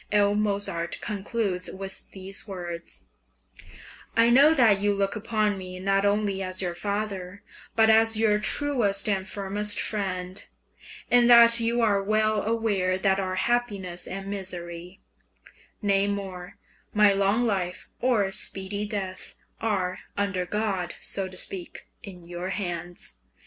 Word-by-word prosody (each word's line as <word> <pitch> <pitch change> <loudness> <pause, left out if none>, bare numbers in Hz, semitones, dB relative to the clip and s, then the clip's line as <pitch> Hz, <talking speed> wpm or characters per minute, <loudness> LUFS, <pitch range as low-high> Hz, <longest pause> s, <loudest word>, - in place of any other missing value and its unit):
L. 205 -1 +4
Mozart 200 -5 -1
concludes 200 -3 -2
with 195 0 -6
the 190 0 -9
words: 175 -3 -6 1.1
I 230 +1 +5
know 285 +6 +6
that 220 -7 +5
you 205 0 +1
look 195 0 0
upon 215 -2 0
me 185 -1 -7
not 195 +1 +1
only 200 -1 0
as 185 0 -3
your 180 -2 0
father, 200 0 -4 0.3
but 220 -1 +5
as 225 0 +5
your 215 -1 +3
truest 210 -5 +2
and 195 -2 -1
firmest 205 +1 0
friend; 185 -3 -3 0.7
and 245 0 +6
that 235 -1 +9
you 235 +1 +1
are 205 -3 +3
well 215 +1 +1
aware 205 -5 0
that 190 0 +2
our 185 -1 -2
happiness 200 -5 -1
and 195 +1 -6
misery 180 -2 -6 0.8
nay 200 0 +2
more, 190 -3 -5 0.4
my 210 -1 +6
long 200 +5 +2
life 185 -5 -2
or 220 -6 +2
speedy 200 +2 -3
death 190 -3 -4 0.3
are, 190 -5 -1 0.2
under 195 -3 -1
God, 200 -4 -2
so 195 -1 -1
to 185 0 -11
speak, 180 -1 -4
in 180 -4 -11
your 175 +2 -5
hands. 175 - -4
200 Hz, 135 wpm, -26 LUFS, 185-215 Hz, 1.1 s, that